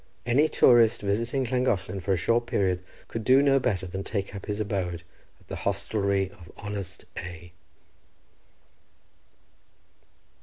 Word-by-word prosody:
Any 130 +6 +4
tourist 120 -2 +5
visiting 115 +6 0
Llangollen 105 -7 0
for 95 - -2
a - - +1
short 115 +6 +1
period 95 -2 0 0.2
could 115 - -5
do 130 +4 +5
no 135 -1 +4
better 100 -8 -1
than 95 +2 -5
take 100 -2 -3
up 100 - -8
his 105 0 -2
abode 95 -5 -2 0.4
at - - -25
the - - -5
hostelry 100 -1 0
of 90 -5 -15
honest 105 -2 -6
A—. 90 0 -7
100 Hz, 130 wpm, -27 LUFS, 95-120 Hz, 0.4 s, tourist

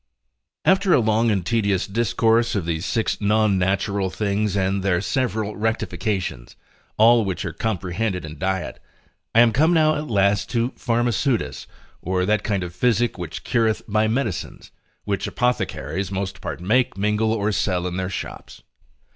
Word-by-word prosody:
After 190 -1 +4
a - - +4
long 110 0 +2
and 95 -5 0
tedious 100 -4 +1
discourse 115 +2 +1
of 95 -5 -1
these 85 +1 -2
six 115 -2 -1
non 105 -1 +2
natural 95 +1 0
things 100 +1 -1
and 95 0 0
their 95 -2 +1
several 110 -2 -1
rectifications, 105 - -2 0.4
all 115 +1 +6
which 95 -3 -3
are - - -4
comprehended 95 -2 -2
in 75 -1 -9
diet, 95 +1 -2 0.5
I 115 - +8
am 120 -1 +5
come 160 +8 +3
now 155 -1 +4
at 150 +1 -4
last 100 -2 +2
to 120 +1 0
Pharmaceutice, 120 0 -1 0.3
or 90 0 0
that 105 +2 +2
kind 100 -3 -1
of 90 -1 -6
physic 120 +3 +1
which 85 -2 -6
cureth 115 -2 +1
by 110 +1 +2
medicines, 110 -5 -3 0.3
which 100 -1 -2
apothecaries 100 -6 -2
most 95 -1 -4
part - - -5
make, 115 +5 +1
mingle, 105 +2 +1
or 105 -1 0
sell 90 -2 0
in 90 0 -3
their 95 0 -2
shops. - - -7
105 Hz, 155 wpm, -22 LUFS, 95-115 Hz, 0.5 s, I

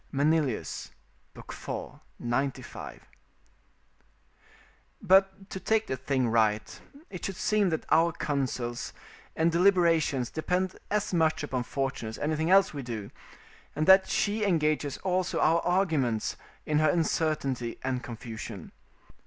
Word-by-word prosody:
Manilius, 145 -3 0 0.5
iv. - - -11 0.7
95.] 130 +3 -3 2.0
But, 195 +1 +3
to 190 - -4
take 220 +3 +1
the 130 - -2
thing 130 -1 0
right, 110 -2 +1 0.3
it 180 - -8
should 195 - -3
seem 210 0 +2
that 160 - -2
our 165 +2 +5
counsels 135 -6 -3 0.4
and 165 +1 +2
deliberations 170 -8 +3
depend 180 +4 -1
as 210 -1 -1
much 160 -2 +2
upon 130 -4 -2
fortune 135 -3 -3
as 110 - -7
anything 155 +2 -1
else 195 -2 +5
we 145 - -4
do, 115 -5 -6 0.6
and 155 - 0
that 190 +1 +7
she 215 +1 0
engages 155 -6 +1
also 185 -1 0
our 165 +2 +4
arguments 160 - +1 0.3
in 150 0 +1
her 155 -1 +4
uncertainty 150 -7 0
and 130 -1 -1
confusion. 115 -5 -8
155 Hz, 120 wpm, -28 LUFS, 130-180 Hz, 2.0 s, that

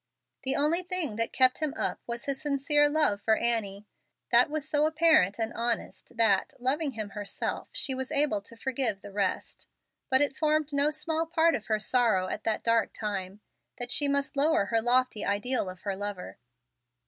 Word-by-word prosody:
The 265 -1 0
only 305 +5 +3
thing 350 -10 -2
that 230 0 -1
kept 255 -1 +3
him 305 -1 -2
up - - -2
was 235 0 -5
his 275 -1 -3
sincere 295 0 +2
love 290 -10 +1
for 220 +1 +2
Annie. 215 -4 -2 0.5
That - - +6
was 305 0 -3
so 300 0 +2
apparent 315 - +3
and 225 0 -3
honest 235 0 -3
that, 210 -4 +2
loving 275 +3 0
him 215 -2 -5
herself, 205 -1 -5
she 270 - +1
was 260 0 -5
able 280 -8 +1
to 230 +3 -10
forgive 245 -6 -2
the 205 - -9
rest. 195 -2 -3 0.4
But 260 0 +3
it 285 -2 +1
formed 310 -1 0
no 285 +1 +2
small 320 +1 -2
part 330 0 +3
of 220 -6 -4
her 215 - +1
sorrow 215 -4 +1
at 210 - -5
that 220 - -1
dark 230 -2 +1
time, 200 -2 -4 0.4
that 245 -1 -5
she 290 - +3
must 280 0 -1
lower 285 -6 +2
her 225 +2 0
lofty 245 -2 +1
ideal 205 +1 -1
of 185 -1 -10
her 200 -2 -3
lover. 200 -6 -6
250 Hz, 185 wpm, -28 LUFS, 210-295 Hz, 0.5 s, That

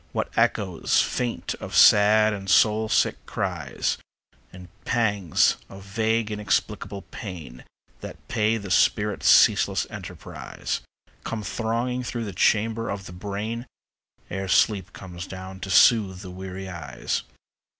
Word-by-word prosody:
What - - -3
echoes 95 -5 +1
faint 120 -2 -1
of - - -6
sad 105 +1 +6
and 100 -1 -6
soul 110 +1 +4
sick - - +1
cries, - - -2 0.5
And 90 -1 -12 0.2
pangs 105 -8 +2
of 95 0 -11
vague 110 +2 0
inexplicable 105 -1 -2
pain 80 - -8 0.3
That - - -10
pay 110 0 +1
the 100 -3 -7
spirit's 105 +1 +2
ceaseless - - +5
enterprise, - - -6 0.4
Come 110 -2 -4
thronging 120 +4 -2
through 120 -1 -4
the 100 - -6
chambers 110 +4 +1
of 100 -1 -5
the 90 - -9
brain 105 +6 -5 0.6
Ere 95 +1 -3
sleep 95 0 +2
comes 90 -1 -9
down 95 0 -8
to 95 - -6
soothe 95 -2 +4
the 95 -3 -9
weary 95 +1 -7
eyes. 80 -9 -4
100 Hz, 130 wpm, -25 LUFS, 95-110 Hz, 0.6 s, sad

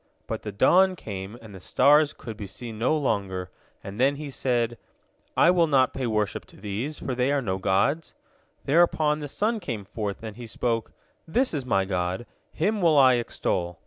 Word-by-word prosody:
But - - -4
the 105 - -5
dawn 185 - +4
came, 100 - -7
and 110 -2 -11
the 95 - -9
stars 145 - +4
could 115 -2 -9
be 105 -2 -7
seen 110 +2 -8
no 130 +7 +2
longer, 95 -9 -2 0.3
and 100 +3 -8
then 135 +3 +3
he 145 0 -7
said, 120 -3 -1 0.6
"I 175 - +6
will 175 -2 +3
not 130 -4 +3
pay 130 -2 -2
worship 105 -2 -1
to - - -18
these, 110 +9 -4
for 130 - -4
they 125 +2 +1
are 145 - +2
no 95 -7 -2
gods." 120 - 0 0.5
Thereupon 155 -1 +3
the 145 - -5
sun 215 +9 -1
came 120 - -5
forth, 100 +1 -5
and 110 -1 -7
he 120 -1 -8
spoke, 115 0 -2 0.4
"This 245 +9 +1
is 135 -4 -3
my 95 -5 +2
god, 90 +3 -2 0.3
him 205 +6 0
will 165 -4 +4
I 130 -2 +6
extol." 90 -7 -2
120 Hz, 190 wpm, -26 LUFS, 100-150 Hz, 0.6 s, I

